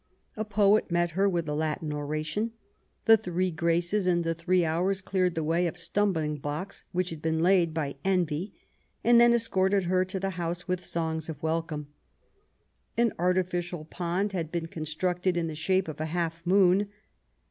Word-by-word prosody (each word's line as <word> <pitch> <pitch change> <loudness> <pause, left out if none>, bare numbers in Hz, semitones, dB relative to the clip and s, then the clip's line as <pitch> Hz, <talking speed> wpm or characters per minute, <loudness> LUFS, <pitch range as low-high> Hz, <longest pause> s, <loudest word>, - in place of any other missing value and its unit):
A 215 - -2
poet 210 0 +3
met 175 0 +1
her 195 +4 +2
with 170 -4 -1
a 150 - -1
Latin 155 0 -2
oration. 155 +9 -2 0.5
The 225 0 +8
three 185 -3 -1
Graces 170 +4 +1
and 175 -1 +2
the 165 0 0
three 175 +1 +1
Hours 180 +5 0
cleared 185 -2 0
the 160 - -1
way 170 +3 +1
of 170 - -5
stumbling 170 -5 0
blocks 150 +7 -5
which 180 0 -1
had 160 -2 -7
been 160 0 0
laid 175 0 +3
by 145 -3 -3
Envy, 180 -1 0 0.5
and 235 0 +6
then 240 0 +7
escorted 200 -4 +2
her 185 +1 +2
to 190 +1 -4
the 195 +1 -2
house 170 +1 -3
with 180 -1 -1
songs 160 -2 -2
of 155 -2 -7
welcome. 160 -2 -2 1.1
An 235 -1 +3
artificial 175 -2 0
pond 180 +5 -2
had 165 -4 -3
been 170 -2 -2
constructed 175 +3 -1
in 170 - 0
the 160 - -4
shape 185 +4 +1
of 155 -1 -6
a 155 - -1
half 170 0 -2
moon. 195 +1 +4
175 Hz, 175 wpm, -28 LUFS, 160-190 Hz, 1.1 s, The